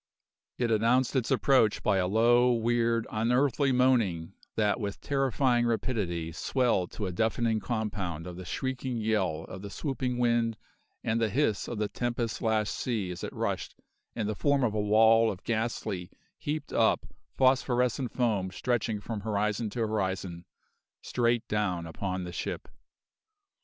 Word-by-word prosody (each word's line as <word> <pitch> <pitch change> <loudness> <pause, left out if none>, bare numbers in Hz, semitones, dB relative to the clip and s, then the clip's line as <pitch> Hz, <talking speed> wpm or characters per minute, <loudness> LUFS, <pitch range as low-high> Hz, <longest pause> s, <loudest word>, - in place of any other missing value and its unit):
It 120 -2 0
announced 115 +5 +2
its 125 -3 +1
approach 130 -6 +3
by 95 - +3
a 90 -1 +1
low, 120 +4 +4
weird, 115 0 +1
unearthly 125 +5 +2
moaning 115 -10 +2 0.2
that 105 0 +1
with 100 -3 -4
terrifying 130 -3 +1
rapidity 95 -9 -1
swelled 105 0 0
to 105 - -3
a 95 - -2
deafening 110 +3 +1
compound 100 -7 -3
of 90 -1 -7
the 95 - -8
shrieking 130 +6 -3
yell 100 -8 0
of 95 - -9
the 100 - -7
swooping 125 0 -2
wind 115 -2 +1 0.5
and 115 +1 0
the 110 - +2
hiss 115 -3 0
of 120 - -4
the 105 0 0
tempest 120 +1 -2
lashed 110 -2 +1
sea 110 -7 -2
as 90 - -7
it - - -4
rushed, - - -3 0.4
in 110 - -1
the 105 - -1
form 140 +4 +1
of 115 -4 +1
a 105 - 0
wall 110 +2 +5
of 95 -2 -6
ghastly, 110 -5 -2 0.3
heaped 150 -1 -4
up, - - +3 0.3
phosphorescent 125 -1 +2
foam 105 -7 0
stretching 110 +1 -1
from 110 0 -4
horizon 105 +1 -1
to 115 +3 -4
horizon, 95 -5 -2 0.6
straight 120 -1 0
down 95 -5 -1
upon 95 +3 -4
the 90 0 -7
ship. - - -4
110 Hz, 150 wpm, -29 LUFS, 100-120 Hz, 0.6 s, wall